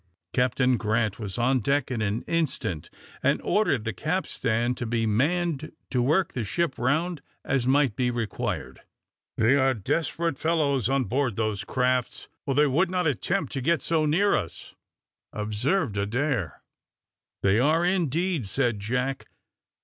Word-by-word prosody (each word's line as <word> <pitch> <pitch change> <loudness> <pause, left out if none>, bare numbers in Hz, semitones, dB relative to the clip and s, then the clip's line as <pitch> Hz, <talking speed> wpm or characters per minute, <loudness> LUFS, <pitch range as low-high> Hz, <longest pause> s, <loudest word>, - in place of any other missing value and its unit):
Captain 125 0 +2
Grant 110 -1 0
was 100 -4 -5
on 130 +2 +2
deck 140 +4 0
in 120 -3 -2
an 105 +2 -1
instant, 155 - -2 0.3
and - - +2
ordered 175 - +1
the 110 -1 -2
capstan 120 - -1
to 120 -1 -4
be 115 0 0
manned 155 +7 0 0.2
to 125 - +2
work 155 +9 +2
the 120 - -2
ship 170 - -1
round 155 +5 0 0.2
as 130 -2 0
might 135 -4 +3
be 125 -1 +1
required. 120 -3 -3 0.6
"They 110 +5 +4
are 135 -1 +3
desperate 160 - -1
fellows 145 -7 +1
on 135 0 +2
board 125 -2 -1
those 110 -2 -1
crafts, 125 -1 -1 0.2
or 135 - 0
they 150 +1 +5
would 160 +7 +2
not 180 -1 0
attempt 170 +6 0
to 135 - -3
get 165 +5 +1
so 160 -2 +1
near 195 +7 +3
us," - - -5 0.6
observed 110 - -1
Adair. 120 - -1 0.8
"They 100 +3 +4
are 155 +6 +3
indeed," 175 - 0
said 120 0 0
Jack. 125 +6 -2
130 Hz, 150 wpm, -26 LUFS, 115-155 Hz, 0.8 s, they